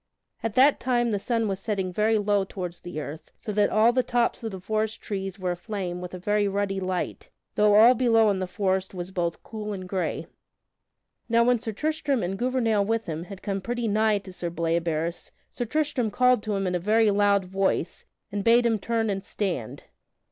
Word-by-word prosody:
At 225 -2 -3
that 275 +3 +5
time 240 -2 +1
the 205 - 0
sun 230 +1 0
was 195 -2 -2
setting 195 -3 -2
very 215 +3 +2
low 205 -1 +2
toward 185 -2 -5
the 175 -3 -6
earth, 150 +1 -7
so 215 - -5
that 205 0 +2
all 220 +3 +4
the 255 - +3
tops 240 -1 0
of 225 - -2
the 190 -3 -7
forest 215 +3 -2
trees 195 -2 -4
were 185 -2 -2
aflame 180 -1 -4
with 180 0 -6
a - - -5
very 205 +3 +1
ruddy 195 0 -1
light, 185 -1 -3 0.2
though 210 0 +4
all 225 +4 +8
below 225 -3 +4
in 195 - -1
the 185 - -2
forest 190 +1 -1
was 180 +1 -5
both 170 -3 -2
cool 210 -1 -5
and 185 -2 -6
gray. 185 0 -2 1.0
Now 230 0 +4
when 245 0 +3
Sir 225 0 -4
Tristram 285 +1 -1
and 180 +2 -2
Gouvernail 230 -2 +1
with 225 +2 -1
him 165 +1 -4
had 195 0 -10
come 195 -1 -2
pretty 240 +2 -2
nigh 215 0 +3
to 195 -2 -9
Sir 175 -1 -4
Bleoberis, 165 0 -1 0.2
Sir 245 - -3
Tristram 285 -3 0
called 250 +1 +3
to 210 -1 -2
him 195 0 -1
in 180 - -1
a 180 - +1
very 215 +3 +3
loud 200 -1 +3
voice, 190 -2 -1 0.3
and 200 0 -2
bade 235 +2 +5
him 225 -2 +2
turn 225 +2 0
and 195 -2 -2
stand. 185 - -3
205 Hz, 205 wpm, -26 LUFS, 185-225 Hz, 1.0 s, all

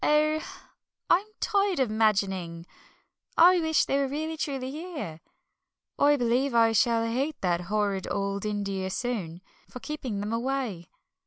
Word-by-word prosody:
"Oh, 305 +1 +3 0.7
I'm 380 +5 +4
tired 400 -5 +1
of 255 -5 +1
'magining! 195 -6 0 0.7
I 355 +2 +7
wish 320 -3 +2
they 275 - +1
were 275 - +1
really 310 +4 -3
truly 270 -4 -3
here. 295 - -6 0.8
I 290 +1 +5
believe 245 +1 +1
I 230 -1 +5
shall 230 +1 +2
hate 265 +7 -2
that 175 -2 +1
horrid 200 0 -1
old 200 0 -2
India 200 -3 -2
soon, 190 -7 -3 0.3
for 250 - -8
keeping 260 -8 -4
them 210 +2 -3
away. 235 -8 -2
235 Hz, 140 wpm, -27 LUFS, 200-290 Hz, 0.8 s, I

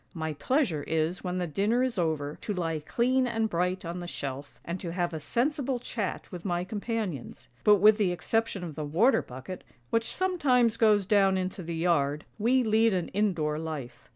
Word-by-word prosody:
My 160 -1 -3
pleasure 210 - 0
is 160 +3 -1
when 180 -1 -2
the 180 - 0
dinner 205 - +1
is 255 -6 -1
over, 155 -3 -1
to 210 - -3
lie 165 -3 -1
clean 250 - +1
and 225 -2 0
bright 180 -1 -1
on 170 +2 -4
thefshelf, 145 -5 -6
and 170 +2 -4
to 170 -2 -5
have 175 -1 -1
a 160 - -3
sensible 265 - 0
chat 225 -5 -4
with 175 -2 -7
my 175 -2 -1
companions; 205 - -4 0.2
but 210 - +7
with 210 +2 +6
the 195 -4 +2
exception 195 +3 -1
of 165 -3 -5
the 155 - -5
water 180 - +3
bucket, 130 +9 -8 0.3
which 230 0 +2
sometimes 270 -11 +2
goes 210 -3 +4
down 195 -1 +4
into 185 0 -3
the 170 -1 -5
yard, 150 -4 +1
we 250 +4 +3
lead 220 -1 +3
an 180 -2 -2
indoor 170 -7 0
life. 145 -7 -6
185 Hz, 185 wpm, -28 LUFS, 160-225 Hz, 0.3 s, but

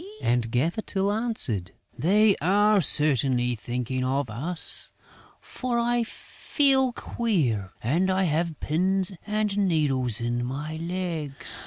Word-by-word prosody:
And 120 -1 0
Gaffer 155 - 0
Tyl 195 -1 -1
answered: 205 - -1 0.2
"They 205 +4 +3
are 205 +4 +3
certainly 130 -5 +1
thinking 125 +3 -3
of 130 -2 -1
us, 160 +10 0 0.5
for 250 -2 -4
I 240 0 +1
feel 265 +1 +1
queer 135 - -2
and 165 +11 +1
I 190 0 +1
have 165 -1 -1
pins 185 +4 +2 0.2
and 210 -1 -1
needles 145 - +1
in 120 +1 -2
my 145 +5 -5
legs." 165 -4 +3
165 Hz, 120 wpm, -25 LUFS, 125-205 Hz, 0.5 s, They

